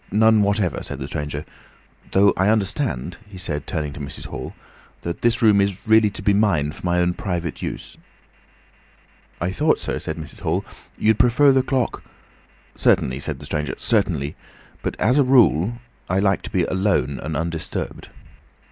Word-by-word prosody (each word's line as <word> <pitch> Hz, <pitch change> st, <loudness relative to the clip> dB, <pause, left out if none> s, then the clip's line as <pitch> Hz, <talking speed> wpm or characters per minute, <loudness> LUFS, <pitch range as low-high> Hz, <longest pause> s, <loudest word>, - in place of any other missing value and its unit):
"None 110 Hz, +1 st, +4 dB
whatever," 100 Hz, -4 st, +1 dB
said -, -, -6 dB
the -, -, -5 dB
stranger. 75 Hz, 0 st, -4 dB, 0.6 s
"Though, 100 Hz, +1 st, +4 dB
I 95 Hz, +2 st, +2 dB
understand," 95 Hz, -, -1 dB
he 95 Hz, -, -11 dB
said 75 Hz, -5 st, -3 dB
turning 75 Hz, -2 st, -3 dB
to -, -, -9 dB
Mrs. 70 Hz, -1 st, -7 dB
Hall, 65 Hz, 0 st, -7 dB, 0.5 s
"that 85 Hz, 0 st, -4 dB
this 120 Hz, 0 st, +2 dB
room 105 Hz, -3 st, +6 dB
is 100 Hz, -2 st, 0 dB
really 110 Hz, -1 st, +5 dB
to 100 Hz, -, -8 dB
be 100 Hz, -, +3 dB
mine 95 Hz, -8 st, +2 dB
for -, -, -13 dB
my 90 Hz, -1 st, +1 dB
own 90 Hz, 0 st, +2 dB
private 90 Hz, -4 st, -4 dB
use." -, -, -6 dB, 1.4 s
"I 90 Hz, +2 st, -1 dB
thought, 150 Hz, +10 st, +2 dB
sir," -, -, -3 dB
said -, -, -5 dB
Mrs. 80 Hz, -2 st, -9 dB
Hall, -, -, -1 dB, 0.3 s
"you'd 110 Hz, 0 st, +2 dB
prefer 125 Hz, +3 st, +5 dB
the 135 Hz, 0 st, +4 dB
clock—" 130 Hz, -1 st, -1 dB, 0.7 s
"Certainly," 65 Hz, +1 st, +2 dB
said -, -, -4 dB
the -, -, -11 dB
stranger, 75 Hz, -4 st, -2 dB
"certainly—but, 70 Hz, +2 st, -3 dB
as 125 Hz, +7 st, +3 dB
a -, -, +6 dB
rule, 120 Hz, -, +4 dB, 0.4 s
I 95 Hz, -, +1 dB
like 95 Hz, 0 st, +2 dB
to -, -, -7 dB
be 90 Hz, -, +1 dB
alone 95 Hz, -, 0 dB
and 75 Hz, -1 st, -3 dB
undisturbed. 80 Hz, 0 st, -4 dB
95 Hz, 165 wpm, -22 LUFS, 80-110 Hz, 1.4 s, room